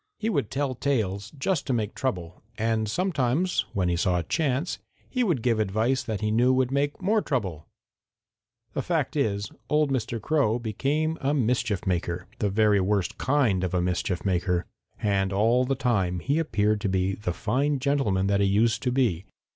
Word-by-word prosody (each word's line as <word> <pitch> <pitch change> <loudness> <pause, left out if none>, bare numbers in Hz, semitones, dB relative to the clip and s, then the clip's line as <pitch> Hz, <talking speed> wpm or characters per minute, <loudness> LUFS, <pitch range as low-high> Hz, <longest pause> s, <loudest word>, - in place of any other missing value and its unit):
He 220 +1 -1
would 140 - 0
tell 140 -1 -1
tales 110 -7 -1
just 160 +3 -1
to 130 - +1
make 110 -3 -1
trouble, 90 -10 -3 0.2
and 110 -1 0
sometimes, 170 - 0
when 95 -3 0
he 90 - +1
saw 90 +1 +1
a 85 - -1
chance, 145 - -1 0.3
he 255 -1 0
would 165 - 0
give 115 -3 +2
advice 110 +6 +1
that 110 -2 -4
he 105 0 0
knew 120 +4 +4
would 130 -1 +2
make 145 +5 -1
more 215 +3 +3
trouble. 95 - -3 1.1
The - - -1
fact - - -1
is, 100 -1 -1 0.2
old 150 -1 +2
Mr. 120 -3 -1
Crow 130 -2 +1
became 140 +8 -1
a 140 +2 +1
mischief 120 -6 0
maker, 90 -1 -1
the 105 - +1
very 105 0 +3
worst 100 -1 0
kind 125 -9 +2
of 90 0 -1
a 90 - +2
mischief 90 0 -1
maker. 90 -2 0 0.3
And 100 -2 +1
all 115 +6 +3
the 135 +1 0
time 95 -9 0
he 140 - 0
appeared 105 -9 +1
to 100 - 0
be 95 +1 +1
the 95 -3 -3
fine 135 +10 0
gentleman 130 -9 +1
that 100 0 +2
he 100 - +3
used 110 +4 +2
to 125 - 0
be. 115 -9 +1
110 Hz, 185 wpm, -26 LUFS, 95-135 Hz, 1.1 s, knew